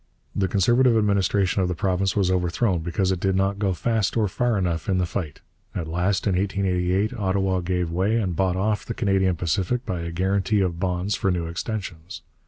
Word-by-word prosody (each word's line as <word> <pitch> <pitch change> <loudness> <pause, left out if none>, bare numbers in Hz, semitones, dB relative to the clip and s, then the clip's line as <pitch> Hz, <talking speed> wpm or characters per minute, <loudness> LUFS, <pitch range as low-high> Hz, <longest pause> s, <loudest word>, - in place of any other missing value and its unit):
The 95 - +1
Conservative 120 +6 +3
administration 100 -2 +2
of 90 - +1
the 90 - -2
province 95 +1 0
was 95 -3 +2
overthrown 90 +2 +1
because 90 +3 -1
it 95 - -1
did 95 +1 +1
not 100 +1 0
go 100 -2 +1
fast 110 +2 0
or 110 -2 +2
far 120 +3 0
enough 85 -2 -1
in 95 - +2
the 90 - +1
fight. 85 -4 -5 0.3
At 80 - -3
last, 90 +4 0
in 95 - +2
1888, 95 +1 0
Ottawa 95 -3 0
gave 90 -1 -1
way 95 +6 +1
and 95 -6 -1
bought 95 0 +1
off 105 +3 0
the 115 - -5
Canadian 95 -4 +1
Pacific 90 - -1
by 95 -5 -3
a 85 0 -4
guarantee 95 +4 +1
of 85 -3 -1
bonds 90 +2 -1
for 100 - 0
new 90 -2 -1
extensions. 90 -1 -5
95 Hz, 195 wpm, -24 LUFS, 90-100 Hz, 0.3 s, Conservative